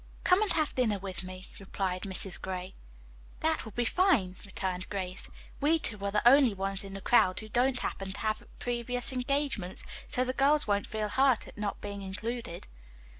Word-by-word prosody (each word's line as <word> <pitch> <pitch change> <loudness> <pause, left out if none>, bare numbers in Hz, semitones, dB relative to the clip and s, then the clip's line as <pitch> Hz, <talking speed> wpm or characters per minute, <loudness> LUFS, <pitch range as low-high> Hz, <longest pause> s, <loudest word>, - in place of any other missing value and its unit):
"Come 365 +3 +5
and 430 - +2
have 310 -2 +1
dinner 225 -5 +2
with 190 -3 -5
me," 185 0 -9
replied 190 -2 -2
Mrs. 190 -1 -2
Gray. 185 0 -4 0.7
"That 320 0 +1
will 220 - -8
be 240 +4 -1
fine," 245 - +3
returned 185 -2 -4
Grace. 185 -2 -4 0.3
"We 305 +3 +4
two 210 -10 -5
are 200 - +1
the 210 +3 +2
only 260 -4 +7
ones 195 0 -1
in 195 0 -8
the 195 - -6
crowd 185 -4 +4
who 215 - -9
don't 255 +3 +2
happen 195 0 -3
to - - -8
have 215 -1 -1
previous 245 +1 -1
engagements, 255 -7 -1 0.2
so 250 - +1
the 255 0 -1
girls 290 +3 +3
won't 205 -1 +1
feel 215 -1 -2
hurt 265 +1 +3
at - - -12
not 210 -1 -3
being 200 -1 -5
included." 210 0 -5
210 Hz, 185 wpm, -30 LUFS, 190-255 Hz, 0.7 s, only